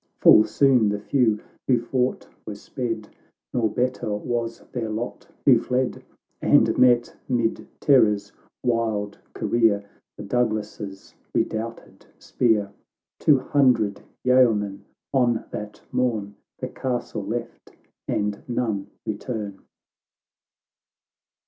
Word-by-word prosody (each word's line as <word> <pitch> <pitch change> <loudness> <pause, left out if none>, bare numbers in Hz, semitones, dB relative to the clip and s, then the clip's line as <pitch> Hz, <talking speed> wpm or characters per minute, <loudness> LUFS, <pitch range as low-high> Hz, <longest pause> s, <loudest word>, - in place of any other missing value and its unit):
G39 - - -42
Full 110 - +8
soon 130 -6 +4
the 105 0 -1
few 110 -1 +2 0.3
who 125 -3 +4
fought 125 +2 -1 0.2
were 105 - -4
sped, 115 0 -4 0.4
Nor 115 -3 +2
better 125 0 -1
was 115 +1 -3
their 115 -3 -3
lot 110 +3 -5 0.2
who 125 -5 +7
fled, 125 +1 -1 0.4
And - - +4
met, 120 -1 +4
'mid 120 -3 0
terror's 105 -7 +4 0.3
wild 110 -4 -1 0.2
career, 105 -4 +2 0.3
The - - -7
Douglas's 105 -3 -2 0.2
redoubted 115 +1 -3
spear! 105 -5 +1 0.5
Two 150 - +5
hundred 125 -7 +2 0.2
yeomen 115 -6 +3 0.3
on 120 -4 +2
that 105 0 -7
morn 110 -5 0 0.2
The - - -4
castle 120 -5 -3
left, 115 +3 -5 0.4
and 105 -1 -1
none 110 -5 -1 0.2
return. 105 -2 -4
115 Hz, 105 wpm, -24 LUFS, 105-125 Hz, 0.5 s, Full